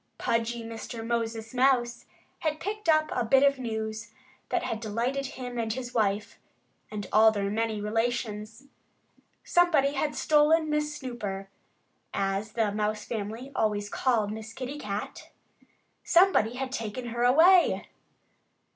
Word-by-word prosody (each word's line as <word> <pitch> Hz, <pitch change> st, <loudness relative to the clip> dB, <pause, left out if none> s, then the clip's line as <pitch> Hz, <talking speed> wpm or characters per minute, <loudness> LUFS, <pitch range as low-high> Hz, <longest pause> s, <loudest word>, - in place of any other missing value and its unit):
Pudgy 230 Hz, 0 st, -1 dB
Mr. 225 Hz, 0 st, -7 dB
Moses 225 Hz, -1 st, -2 dB
Mouse 245 Hz, -2 st, +2 dB, 0.3 s
had 310 Hz, -1 st, -1 dB
picked 415 Hz, -1 st, -4 dB
up 310 Hz, -1 st, +3 dB
a 245 Hz, -, 0 dB
bit 265 Hz, +4 st, +4 dB
of 280 Hz, -1 st, +3 dB
news 220 Hz, -2 st, -4 dB, 0.4 s
that 220 Hz, -, -1 dB
delighted 240 Hz, +5 st, -2 dB
him 250 Hz, -2 st, -6 dB
and 225 Hz, -1 st, -1 dB
his 245 Hz, +1 st, -5 dB
wife 210 Hz, -2 st, 0 dB, 0.5 s
and 210 Hz, -2 st, -5 dB
all 220 Hz, +1 st, +7 dB
their 200 Hz, -2 st, -1 dB
many 220 Hz, 0 st, -1 dB
relations. 220 Hz, +1 st, -2 dB, 0.8 s
Somebody 320 Hz, -6 st, +3 dB
had 295 Hz, +1 st, -1 dB
stolen 310 Hz, +1 st, +3 dB
Miss 300 Hz, 0 st, -1 dB
Snooper 205 Hz, -8 st, -5 dB, 0.7 s
as 195 Hz, +2 st, -1 dB
the 225 Hz, -3 st, +1 dB
Mouse 210 Hz, 0 st, -2 dB
family 225 Hz, +4 st, -5 dB
always 205 Hz, -1 st, 0 dB
called 220 Hz, -3 st, +1 dB
Miss 220 Hz, 0 st, -7 dB
Kitty 265 Hz, +5 st, -6 dB
Cat! 205 Hz, -4 st, -5 dB, 0.7 s
Somebody 340 Hz, -, +4 dB
had 260 Hz, 0 st, -4 dB
taken 235 Hz, 0 st, -4 dB
her 235 Hz, +1 st, -2 dB
away! 330 Hz, +9 st, +5 dB
230 Hz, 130 wpm, -28 LUFS, 215-270 Hz, 0.8 s, all